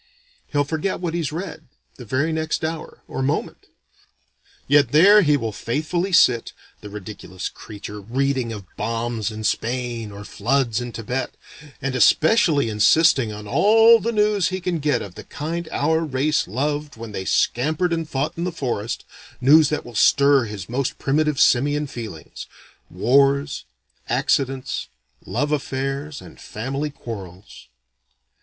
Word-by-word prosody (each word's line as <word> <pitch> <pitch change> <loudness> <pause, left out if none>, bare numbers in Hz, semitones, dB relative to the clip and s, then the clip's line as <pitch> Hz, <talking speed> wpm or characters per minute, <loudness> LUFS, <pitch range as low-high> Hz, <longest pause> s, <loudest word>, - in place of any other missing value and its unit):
He'll 145 -1 +1
forget 160 +6 -2
what 175 -2 -3
he's 165 -4 -2
read, 160 -1 -6 0.3
the 125 - -10
very 140 +9 0
next 160 0 -1
hour, 160 0 -6
or - - -4
moment. 135 +2 -2 1.0
Yet 145 -2 +4
there 200 +7 +7
he 150 -5 +3
will 115 -4 -3
faithfully 160 - -2
sit, 125 -9 +4 0.3
the 105 - -10
ridiculous 100 -2 -7
creature, 105 -1 -9
reading 130 +2 -1
of 105 -4 -7
bombs 115 0 -2
in 110 0 -7
Spain 120 0 -2
or 100 +1 -9
floods 120 +2 0
in 120 0 -5
Thibet, 125 +4 -4 0.5
and 135 -1 -1
especially 155 - +4
insisting 115 +3 +4
on 105 0 -8
all 225 - +6
the 230 - -1
news 210 -3 +2
he 185 0 -3
can 175 -2 -2
get 145 -5 0
of 100 - -9
the - - -10
kind 165 +3 -5
our 160 +3 +1
race 150 +1 0
loved 145 +7 -2
when 115 -1 -8
they 95 - -4
scampered 155 - +1
and 165 -2 -3
fought 140 +3 -2
in 170 - -4
the 180 - -1
forest, 120 -8 -3 0.3
news 150 +3 +6
that 155 - -2
will 120 - -10
stir 140 +4 +4
his 105 -4 -7
most 125 +2 -2
primitive 150 0 0
simian 145 +4 +3
feelings, 110 - -8 0.4
wars, 140 +2 +2 0.4
accidents, 135 -1 0 0.4
love 145 +1 -1
affairs, 140 +1 -3
and - - -14
family 135 +7 -4
quarrels. 100 - -10
135 Hz, 145 wpm, -22 LUFS, 115-155 Hz, 1.0 s, there